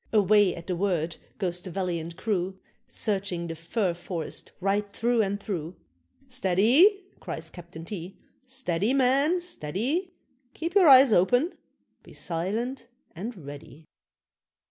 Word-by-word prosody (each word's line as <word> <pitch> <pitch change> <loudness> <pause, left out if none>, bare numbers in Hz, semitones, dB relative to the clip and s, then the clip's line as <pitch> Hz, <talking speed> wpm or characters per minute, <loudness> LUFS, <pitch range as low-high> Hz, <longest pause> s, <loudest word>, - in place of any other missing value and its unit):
Away 205 -3 +4
at 170 - -9
the 180 - -2
word 170 -3 -1 0.2
goes 180 -3 -2
the 185 - -8
valiant 170 -2 -3
crew, 190 -3 -1 0.3
Searching 190 -4 -2
the 165 - -4
fir 170 +4 -1
forest 170 -1 -6
right 200 +2 0
through 235 +2 +1
and 200 -1 -1
through: 180 -4 -4 0.5
"Steady!" 255 - +4 0.2
cries - - -6
Captain 170 -2 -10
T, 180 0 -7 0.3
"steady, 255 -3 -1
men, 275 +7 +3
steady! 320 - -3 0.4
Keep 335 +2 -3
your 385 -4 +6
eyes 260 -3 +8
open 245 - +3 0.5
be - - -16
silent 220 +9 -3 0.3
and 190 - -7
ready." 145 +2 -10
195 Hz, 125 wpm, -27 LUFS, 175-250 Hz, 0.5 s, eyes